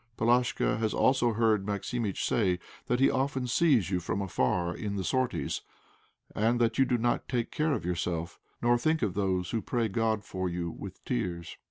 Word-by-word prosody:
Palashka 120 0 +2
has 110 -1 0
also 125 -3 +3
heard 110 -2 +2
Maximitch 105 +1 -2
say 95 -6 +2 0.3
that 125 - +1
he 135 - +5
often 135 -1 0
sees 125 - +3
you 90 - +1
from 90 +2 -2
afar 85 -1 0
in 100 -1 -4
the 95 - -2
sorties, 130 +4 -1 0.7
and 115 +3 +2
that 115 0 +1
you 135 - +6
do 125 - +1
not 120 +1 0
take 120 -3 -1
care 155 0 +1
of 85 - -3
yourself, 85 -1 -2 0.2
nor 120 0 +4
think 155 +2 +1
of 100 -4 0
those 95 -3 0
who 115 - 0
pray 115 0 0
God 110 0 0
for 95 -1 -3
you 85 -1 -3
with - - -10
tears. 85 +7 -3
110 Hz, 185 wpm, -29 LUFS, 95-120 Hz, 0.7 s, you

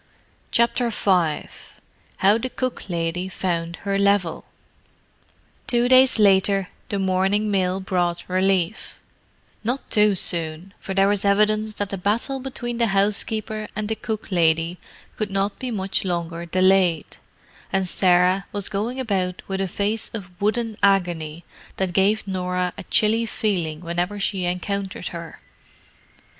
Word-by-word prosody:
CHAPTER 235 +1 +2
V 180 -8 +1 0.7
HOW 200 +3 +4
THE 255 +3 -3
COOK 255 -5 -4
LADY 170 +1 -2
FOUND 170 -2 -2
HER 200 0 +1
LEVEL 200 -4 +1 1.2
Two 240 0 +2
days 260 0 +6
later, 195 -2 +3 0.2
the 200 - -1
morning 195 +2 +1
mail 185 -1 +1
brought 175 -2 -1
relief—not 195 +6 -3
too 210 -1 +4
soon, 170 +1 -1
for 190 - -5
there 195 0 +4
was 205 -1 +1
evidence 215 +1 +2
that 205 -1 -3
the 195 - -3
battle 230 +8 0
between 245 -2 -5
the 235 - +3
housekeeper 210 +2 0
and 210 0 -3
the 220 - 0
cook 220 -1 -5
lady 165 0 +2 0.4
could 215 -1 -1
not 195 +1 -1
be 255 - -3
much 195 -4 -1
longer 170 -2 -3
delayed, 185 -2 +2 0.5
and 190 -1 +1
Sarah 180 +1 +3
was 205 -1 -4
going 215 +5 -2
about 190 -7 -1
with 195 0 -2
a 195 - 0
face 205 +3 -2
of 190 -5 -7
wooden 220 +1 0
agony 175 -5 +1 0.3
that 190 -2 -1
gave 200 +3 +2
Norah 180 -1 -1
a - - -9
chilly 225 +2 +2
feeling 175 -9 -2
whenever 175 +4 -2
she 195 -2 -1
encountered 185 +2 -3
her. 170 -1 -8
195 Hz, 135 wpm, -23 LUFS, 180-215 Hz, 1.2 s, days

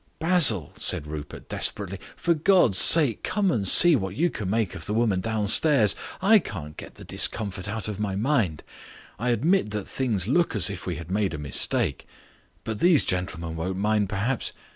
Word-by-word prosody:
"Basil," 160 - +4
said - - -1
Rupert 75 -1 -9
desperately, 100 -2 -3 0.2
"for 175 -1 0
God's 160 - +2
sake 145 -10 +4
come 200 -3 -1
and 100 - -1
see 170 - +8
what 95 -5 -4
you 170 +6 0
can 100 -4 -6
make 110 -2 -2
of - - -9
the 105 - -3
woman 110 -5 0
downstairs. 110 - +3 0.3
I 215 +2 +5
can't 80 - -9
get - - -12
the - - -13
discomfort 100 -3 0
out 110 -1 -5
of 105 -2 -6
my 100 -2 -3
mind. 105 - -1 0.6
I 125 +3 -2
admit 155 - 0
that 105 -2 -4
things 110 -9 -2
look 165 +2 0
as 100 -5 +3
if - - -9
we - - -3
had 85 +1 -10
made 100 -4 -2
a - - -7
mistake. 75 -2 0 0.6
But 110 -2 -6
these 175 -4 +3
gentlemen 85 -3 -4
won't 90 +3 -5
mind 105 0 -1
perhaps..." 110 +6 -2
105 Hz, 185 wpm, -24 LUFS, 95-135 Hz, 0.6 s, see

